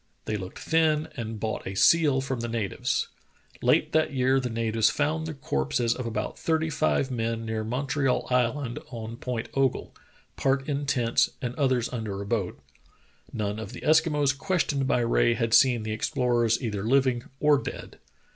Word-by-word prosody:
They 110 Hz, -, -2 dB
looked 95 Hz, -2 st, -6 dB
thin 160 Hz, -1 st, +1 dB
and 110 Hz, -2 st, -5 dB
bought 110 Hz, +1 st, -3 dB
a 95 Hz, -, -5 dB
seal 145 Hz, +3 st, +4 dB
from 135 Hz, -2 st, -3 dB
the 120 Hz, -, -3 dB
natives. 115 Hz, -4 st, -1 dB, 0.5 s
Late -, -, +3 dB
that 155 Hz, -1 st, +2 dB
year 130 Hz, 0 st, +2 dB
the 125 Hz, -1 st, -3 dB
natives 115 Hz, -1 st, +1 dB
found 155 Hz, +2 st, -1 dB
the 160 Hz, -, -5 dB
corpses 70 Hz, -, 0 dB
of 125 Hz, -1 st, -5 dB
about 110 Hz, -1 st, -4 dB
thirty 160 Hz, -1 st, 0 dB
five 80 Hz, -, +1 dB
men 115 Hz, -1 st, -2 dB
near 110 Hz, -1 st, -2 dB
Montreal 135 Hz, +3 st, 0 dB
Island 125 Hz, +2 st, 0 dB
and 115 Hz, -1 st, -7 dB
Point 125 Hz, -3 st, -3 dB
Ogle, 135 Hz, -2 st, 0 dB, 0.4 s
part 135 Hz, 0 st, +1 dB
in 145 Hz, -1 st, -2 dB
tents 120 Hz, -4 st, +2 dB
and 125 Hz, -1 st, -3 dB
others 130 Hz, -4 st, +1 dB
under 110 Hz, -5 st, -4 dB
a 100 Hz, -, -5 dB
boat. 100 Hz, -4 st, -2 dB, 0.7 s
None 105 Hz, -1 st, -3 dB
of 110 Hz, +1 st, -7 dB
the -, -, -8 dB
Eskimos 150 Hz, -3 st, +3 dB
questioned 145 Hz, -5 st, 0 dB
by 125 Hz, -, +2 dB
Rae 120 Hz, 0 st, +2 dB
had 115 Hz, -1 st, -1 dB
seen 125 Hz, -4 st, +5 dB
the 110 Hz, -, -4 dB
explorers 120 Hz, -1 st, +1 dB
either 105 Hz, -4 st, -2 dB
living 125 Hz, +1 st, +2 dB
or 150 Hz, -2 st, +4 dB
dead. -, -, -8 dB
125 Hz, 170 wpm, -26 LUFS, 115-140 Hz, 0.7 s, seen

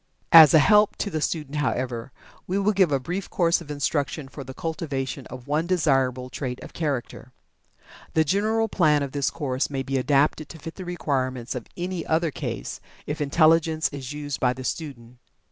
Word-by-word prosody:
As 160 Hz, -3 st, +10 dB
a -, -, +10 dB
help 210 Hz, +6 st, +5 dB
to 205 Hz, -, -3 dB
the 155 Hz, -2 st, -2 dB
student, 150 Hz, -2 st, -2 dB
however, 130 Hz, -3 st, -2 dB, 0.4 s
we 185 Hz, -, -1 dB
will 200 Hz, +1 st, +2 dB
give 190 Hz, -6 st, +3 dB
a 140 Hz, -, +2 dB
brief 180 Hz, +8 st, -4 dB
course 170 Hz, -1 st, +2 dB
of 155 Hz, -, -12 dB
instruction 145 Hz, 0 st, -2 dB
for 140 Hz, +1 st, -9 dB
the 130 Hz, 0 st, -10 dB
cultivation 140 Hz, -5 st, -4 dB
of 125 Hz, -1 st, -10 dB
one 155 Hz, +4 st, 0 dB
desirable 135 Hz, -7 st, +1 dB
trait 125 Hz, -2 st, -4 dB
of -, -, -11 dB
character. 135 Hz, -5 st, -4 dB, 0.8 s
The 160 Hz, -, +5 dB
general 215 Hz, +7 st, +1 dB
plan 150 Hz, -8 st, +3 dB
of 140 Hz, -, -4 dB
this 140 Hz, -1 st, 0 dB
course 135 Hz, -5 st, -2 dB
may 135 Hz, -2 st, -3 dB
be 135 Hz, 0 st, -1 dB
adapted 145 Hz, +3 st, +1 dB
to 165 Hz, -, -9 dB
fit 165 Hz, +1 st, -8 dB
the 185 Hz, -, -8 dB
requirements 130 Hz, -8 st, -2 dB
of 125 Hz, -4 st, -6 dB
any 180 Hz, 0 st, -3 dB
other 160 Hz, 0 st, +1 dB
case, -, -, -5 dB, 0.2 s
if 150 Hz, +1 st, -4 dB
intelligence 160 Hz, +2 st, +3 dB
is 135 Hz, -3 st, -7 dB
used 145 Hz, -2 st, -5 dB
by 125 Hz, -1 st, +2 dB
the 130 Hz, +1 st, -8 dB
student. 125 Hz, -5 st, -6 dB
150 Hz, 185 wpm, -25 LUFS, 135-165 Hz, 0.8 s, As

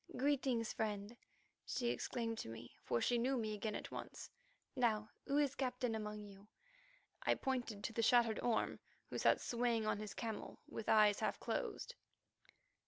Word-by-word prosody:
"Greetings, 260 Hz, -4 st, +1 dB
friend," 210 Hz, +1 st, -2 dB, 0.5 s
she 240 Hz, -2 st, -1 dB
exclaimed 230 Hz, -2 st, -2 dB
to -, -, -4 dB
me, 115 Hz, +1 st, -9 dB
for 120 Hz, -, +1 dB
she 240 Hz, -, +3 dB
knew 260 Hz, +3 st, +2 dB
me 215 Hz, -2 st, -1 dB
again 210 Hz, 0 st, -2 dB
at -, -, -5 dB
once. -, -, -7 dB, 0.4 s
"Now, 215 Hz, -4 st, +2 dB, 0.2 s
who 280 Hz, +1 st, +2 dB
is 285 Hz, -2 st, +3 dB
captain 250 Hz, -3 st, -1 dB
among 210 Hz, -1 st, -4 dB
you?" 200 Hz, 0 st, -13 dB, 0.7 s
I -, -, +3 dB
pointed 245 Hz, -6 st, -2 dB
to 230 Hz, -, -2 dB
the 230 Hz, -, +1 dB
shattered 230 Hz, -1 st, +5 dB
Orme, 235 Hz, -2 st, +1 dB, 0.3 s
who -, -, -2 dB
sat -, -, +5 dB
swaying 235 Hz, -2 st, +1 dB
on 215 Hz, -1 st, +1 dB
his 210 Hz, -1 st, -5 dB
camel 225 Hz, -3 st, -4 dB
with 220 Hz, -, -5 dB
eyes 210 Hz, -2 st, +6 dB
half -, -, 0 dB
closed. -, -, -2 dB
225 Hz, 165 wpm, -39 LUFS, 210-245 Hz, 0.7 s, eyes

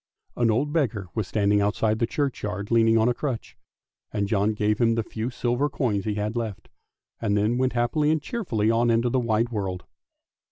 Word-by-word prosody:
An 120 Hz, -1 st, +2 dB
old 135 Hz, +7 st, +1 dB
beggar 110 Hz, -, 0 dB
was 110 Hz, -4 st, -2 dB
standing 105 Hz, -1 st, +2 dB
outside 105 Hz, +2 st, +1 dB
the 115 Hz, -, +1 dB
churchyard 105 Hz, -7 st, -3 dB
leaning 115 Hz, -1 st, +4 dB
on 110 Hz, +1 st, +3 dB
a 125 Hz, -, +3 dB
crutch, 125 Hz, -2 st, -4 dB, 0.6 s
and 100 Hz, -1 st, -1 dB
John 105 Hz, +1 st, +1 dB
gave 105 Hz, 0 st, +1 dB
him 115 Hz, -1 st, +3 dB
the 115 Hz, -, 0 dB
few 110 Hz, +2 st, -4 dB
silver 125 Hz, +3 st, 0 dB
coins 105 Hz, -10 st, -1 dB
he 105 Hz, -2 st, -1 dB
had 105 Hz, +2 st, -2 dB
left, 115 Hz, -4 st, -4 dB, 0.5 s
and 105 Hz, -2 st, +1 dB
then 110 Hz, +4 st, +1 dB
went 130 Hz, 0 st, +1 dB
happily 120 Hz, +5 st, +1 dB
and 155 Hz, 0 st, +2 dB
cheerfully 135 Hz, -, -1 dB
on 120 Hz, +1 st, +2 dB
into 115 Hz, +1 st, +2 dB
the 130 Hz, -, +2 dB
wide 115 Hz, -1 st, +1 dB
world. 95 Hz, -5 st, -3 dB
115 Hz, 195 wpm, -25 LUFS, 105-120 Hz, 0.6 s, leaning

